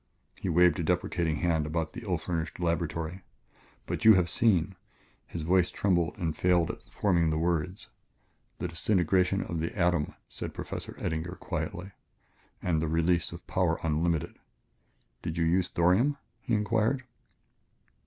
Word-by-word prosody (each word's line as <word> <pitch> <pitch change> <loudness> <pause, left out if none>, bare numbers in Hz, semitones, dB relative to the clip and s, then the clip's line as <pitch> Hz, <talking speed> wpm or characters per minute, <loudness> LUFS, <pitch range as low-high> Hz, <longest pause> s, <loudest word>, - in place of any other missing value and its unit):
He 95 - -4
waved 90 -1 +4
a - - 0
deprecating 85 -1 0
hand 80 -2 +1
about 80 0 -2
the - - -7
ill 95 -6 -1
furnished 80 -1 -4
laboratory. 85 +1 -2 0.6
"But - - -3
you 110 -2 +9
have 90 -2 +2
seen 95 -5 +2 0.3
" - - -31 0.2
His 85 - -5
voice 90 +2 +3
trembled 90 -4 0
and 80 -3 -2
failed 90 -1 +2
at - - -12
the - - -26
forming 90 -5 +2
of - - +2
the 80 - 0
words. 85 +2 -1 0.4
" - - -42
The 90 - -3
disintegration 90 +2 +2
of 85 - -4
the 85 +5 -3
atom," 85 -4 +1
said - - -6
Professor - - -6
Eddinger 80 +3 -3
quietly, 95 +3 -4 0.7
"and 80 -3 +1
the 80 - 0
release 85 +1 +1
of 85 +1 -10
power 90 -3 +1
unlimited. 80 0 0 0.8
Did 80 0 -4
you 85 - +2
use 90 +2 +2
thorium?" 95 +14 +3 0.2
he 120 - 0
inquired. 110 +5 +1
85 Hz, 160 wpm, -29 LUFS, 80-95 Hz, 0.8 s, you